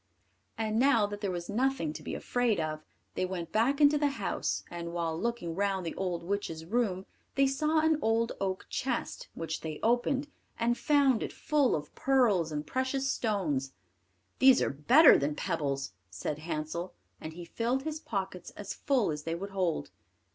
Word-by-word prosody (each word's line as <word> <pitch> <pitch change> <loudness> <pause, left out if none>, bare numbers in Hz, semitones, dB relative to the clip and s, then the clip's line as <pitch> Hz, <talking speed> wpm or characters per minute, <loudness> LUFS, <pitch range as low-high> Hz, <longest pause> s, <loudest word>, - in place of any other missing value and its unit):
And 220 0 0
now 245 -5 +5
that 205 0 -6
there 200 - -1
was 175 -1 -4
nothing 235 - 0
to 155 - -8
be - - -5
afraid 245 -6 0
of, 155 -1 -3 0.3
they - - -1
went 180 -3 -4
back 255 +6 +2
into 295 0 +5
the 290 -1 +3
house, - - -2
and 170 -1 -5
while 165 -2 -1
looking 225 -3 -2
round 195 0 0
the 165 - -3
old 180 -3 -3
witch's 170 -4 -3
room, 195 -2 0 0.3
they 275 - +4
saw 305 +4 +2
an 315 -1 +3
old 225 0 +2
oak 190 -1 -2
chest, 255 -3 -3
which 160 -1 -4
they 155 -2 -5
opened, 245 +4 +2 0.3
and 235 +1 +2
found 275 -4 +3
it - - -3
full 295 -5 +2
of 150 -1 -6
pearls 225 -12 +2
and 150 0 -3
precious 260 - -1
stones. 155 - -1 0.7
"These 265 -1 +7
are - - +1
better 250 - +7
than 145 +1 -1
pebbles," 140 - -2 0.2
said 95 +11 -4
Hansel; 160 +2 -4 0.3
and 155 - -6
he 175 +1 -8
filled 240 +8 -1
his 310 0 -3
pockets 195 - -4
as 200 -1 -5
full 255 - +1
as 150 0 -4
they 165 +2 -3
would 195 +3 -6
hold. 185 -4 -1
200 Hz, 175 wpm, -30 LUFS, 165-255 Hz, 0.7 s, These